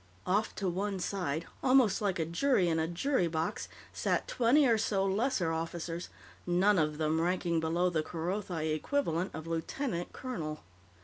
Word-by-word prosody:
Off 205 +4 +1
to 195 - -2
one 195 +3 -1
side, 175 -4 -2 0.2
almost 255 -7 +4
like 200 -3 0
a 165 - 0
jury 185 - +2
in 165 -1 +1
a 160 - +1
jury 180 - +1
box, 160 0 -2 0.2
sat - - 0
twenty 255 +5 +4
or 235 -3 +5
so 205 -3 +1
lesser 195 -3 +1
officers, 165 +1 -4 0.4
none 185 +2 +4
of 150 -1 0
them 160 +1 +1
ranking 175 -1 +1
below 165 +3 +1
the 165 -3 +1
Kerothi 170 -1 -2
equivalent 175 - 0
of 155 0 -6
lieutenant 170 - -3
colonel. 155 -13 -5
175 Hz, 160 wpm, -31 LUFS, 165-205 Hz, 0.4 s, or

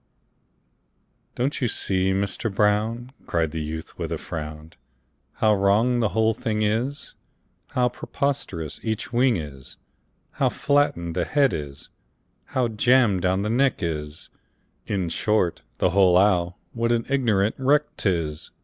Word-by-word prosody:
"Don't 135 +4 -1
you 125 - +2
see, 95 -3 0
Mister 100 +4 -1
Brown," 110 +4 0 0.2
Cried 80 -2 0
the 80 - -3
youth, 80 +1 -6
with - - -3
a - - -1
frown, 75 0 -7 0.6
"How 110 -1 +3
wrong 105 +5 +3
the 110 -3 +2
whole 110 +3 +2
thing 110 -1 -2
is, 115 +7 -1 0.6
How 125 -1 +3
preposterous 120 - -3
each 110 +2 -3
wing 120 -2 +3
is, 70 -5 -9 0.5
How - - +1
flattened 85 - 0
the 90 - +1
head 140 -2 +2
is, 70 -3 -6 0.6
how 130 -2 0
jammed 115 -3 +3
down 95 +2 +1
the 105 - -1
neck 130 -2 +1
is 75 -2 -4 0.6
In 95 -4 -1
short, 90 +1 0 0.2
the 90 - +2
whole 90 -1 +5
owl, 90 -3 +2 0.2
what 115 0 0
an 115 -1 +1
ignorant 115 -7 +2
wreck 145 +3 +2
't 100 - +1
is! 80 -4 -3
105 Hz, 140 wpm, -24 LUFS, 85-120 Hz, 0.6 s, whole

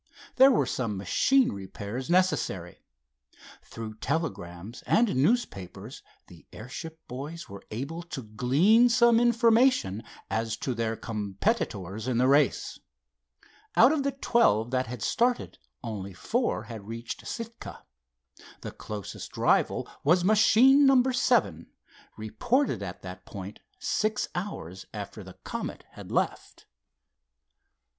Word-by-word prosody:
There 265 +1 +8
were 245 - +3
some 115 -5 -2
machine 255 - +2
repairs 100 - -6
necessary. 175 - 0 0.8
Through 110 -1 -8
telegrams 110 - -4
and 225 - +3
newspapers 125 - -1 0.2
the - - -17
airship 160 +8 -8
boys 145 +7 -7
were 100 0 -10
able 140 +10 -5
to 160 -7 -7
glean 145 - +4
some 235 -1 +5
information 235 - +3 0.3
as 110 0 -2
to 130 - -2
their 115 -1 -2
competitors 105 - -3
in 125 -2 0
the 125 +1 +3
race. 140 +2 +2 1.0
Out 245 +5 +7
of 310 -2 +1
the 275 0 -1
twelve 120 - +2
that 130 0 0
had 120 -1 -6
started 245 +1 0 0.2
only 100 -4 -5
four 235 - -1
had 110 -3 -9
reached 115 +1 -7
Sitka. 230 0 -7 0.8
The - - -6
closest 105 -3 -8
rival - - +2 0.2
was 175 +5 +4
machine 245 +7 +6
number 260 -1 +4
seven, 230 - +1 0.5
reported 230 - 0
at 90 -2 -7
that 90 0 -9
point 100 +1 -8 0.2
six 250 -6 -1
hours 95 - -6
after 105 0 -7
the 95 -1 -13
Comet - - -5
had - - -11
left. - - -2
130 Hz, 120 wpm, -27 LUFS, -, 1.0 s, There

